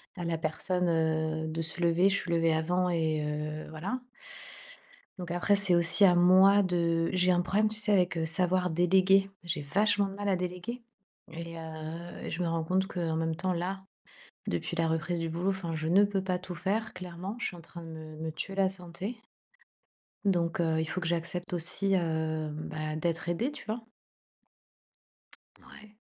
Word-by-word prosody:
à 175 - -5
la 165 -1 0
personne, 180 +3 0
heu, 160 -1 0
de 160 +1 -3
se 165 +2 -1
lever. 170 +2 +4
Je 200 - +1
suis 180 - -4
levée 165 -1 +3
avant 180 +3 +1
et 160 -3 0
heu, 150 +1 -4
voilà. 190 +11 -4 1.2
Donc 175 -2 -6
après, 175 +3 +2
c'est 200 -3 +3
aussi 170 +4 +5
à 180 -2 +7
moi 190 +3 +6
de 170 -2 +1
j'ai 180 0 +3
un 175 - +3
problème, 200 +4 +2
tu 215 - -2
sais, 210 0 +2
avec, 180 -3 +3
heu, 165 - 0
savoir 180 +2 +2
déléguer. 190 +3 +4
J'ai 170 -3 -2
vachement 205 +7 +2
de 195 - -8
mal 205 0 -3
à 190 - +3
déléguer 180 +7 -4 0.5
et 170 0 -7
heu 160 +1 -7
et - - -4
je 175 - -2
me 175 - 0
rends 165 -1 -1
compte 185 +3 +1
qu'en 170 -4 -2
même 160 0 -1
temps, 185 +2 -1
là, 185 +2 -3 0.6
depuis 85 - -2
la 165 -1 +2
reprise 160 +2 -1
du 165 0 -2
boulot, 170 +4 -1
enfin, 180 -4 -3
je 160 0 -2
ne 195 +4 +6
peux 200 -1 -1
pas 185 -1 -1
tout 180 0 -7
faire. 205 +5 -2
Clairement, 185 +3 -6
je - - -1
suis 175 - -5
en - - -11
train 170 +1 -11
de - - -9
me 155 -1 -9
me 160 +1 -4
tuer 195 +5 -4
la 195 -1 +3
santé. 185 +4 -5 1.1
Donc, 175 -4 +1
heu, 160 -1 +1
il 160 - -1
faut 185 - -3
que 170 - -4
j'accepte 175 +2 -2
aussi, 185 +3 0
heu, 160 -2 -1
bah, 155 0 -4
d'être 165 +1 -2
aidée, 200 +11 0
tu 295 - -10
vois? 225 +1 -4 1.8
Ouais. 215 0 -15
175 Hz, 195 wpm, -30 LUFS, 160-190 Hz, 1.8 s, à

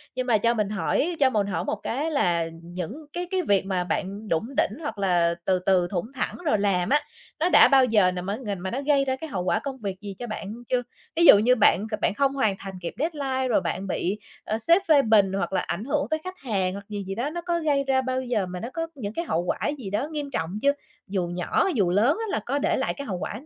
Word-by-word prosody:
Nhưng 255 0 -2
mà 225 - +4
cho 230 +3 +2
mình 210 -3 -1
hỏi, 280 - 0
cho 270 -2 +5
mình 210 -5 0
hỏi 180 -3 -2
một - - -1
cái 295 +7 -2
là 175 - +1 0.2
những 180 - -6
cái 355 0 -3
cái 375 -1 +1
việc 200 - +2
mà 185 -2 0
bạn 200 +4 -3
đủng 220 +11 -2
đỉnh 215 - +1
hoặc 290 -7 -4
là 175 -3 +2
từ 185 -1 +2
từ, 180 -1 +2
thủng 195 +6 -3
thẳng 265 - -2
rồi 220 - +3
làm 190 -3 +1
á, 295 +2 +4 0.4
nó 345 +3 +2
đã - - +8
bao 265 -1 +5
giờ 210 -6 +4
nà 180 0 -4
má 195 +3 -3
ng 200 -7 -5
mà 190 - -3
nó 265 +3 -2
gây 280 -1 +2
ra 260 -1 0
cái 315 +4 -8
hậu 190 -8 -2
quả 180 - +1
công 270 -2 -5
việc 195 -4 -5
gì 200 -2 -7
cho 240 - -5
bạn 215 -2 -5 0.2
chưa? 250 -1 +2 0.3
Ví 340 - +4
dụ 205 - +10
như 245 +4 +4
bạn 215 -2 +3
c 215 - -2
bạn - - +2
không 275 +4 +1
hoàn 220 -8 +1
thành 195 -1 -7
kịp 170 - -4
deadline 275 -4 -1
rồi 245 - +2
bạn 190 +2 -3
bị, 190 +3 -1 0.3
ờ, 215 - -1
sếp 335 - +4
phê 295 -3 +6
bình 210 -5 +4
hoặc 195 0 -2
là 185 - +2
ảnh 195 - -4
hưởng 275 - 0
tới 315 - 0
khách 370 0 -7
hàng 195 -7 -1
hoặc 200 0 -8
gì 205 -1 -4
gì 195 - -3
đó, 250 +6 -1
nó 345 +2 -5
có 340 0 -1
gây 290 -3 +1
ra 265 -1 +3
bao 260 0 -1
giờ 240 -6 -1
mà 180 0 -6
nó 235 - -5
có 330 0 -2
những 210 -6 -5
cái 335 - -3
hậu 170 - 0
quả - - -1 0.2
gì 230 -8 -6
đó 210 +9 -1
nghiêm 295 -2 -4
trọng 180 +1 -3
chưa? 280 - +4 0.4
Dù 190 -3 -1
nhỏ, 175 - 0
dù 195 -7 +2
lớn 220 - +3
á 450 - -2
là - - 0
có 280 +3 0
để - - +1
lại 265 - -1
cái 280 -3 -7
hậu 185 - -2
quả 210 +5 -5
220 Hz, 275 wpm, -25 LUFS, 190-275 Hz, 0.4 s, dụ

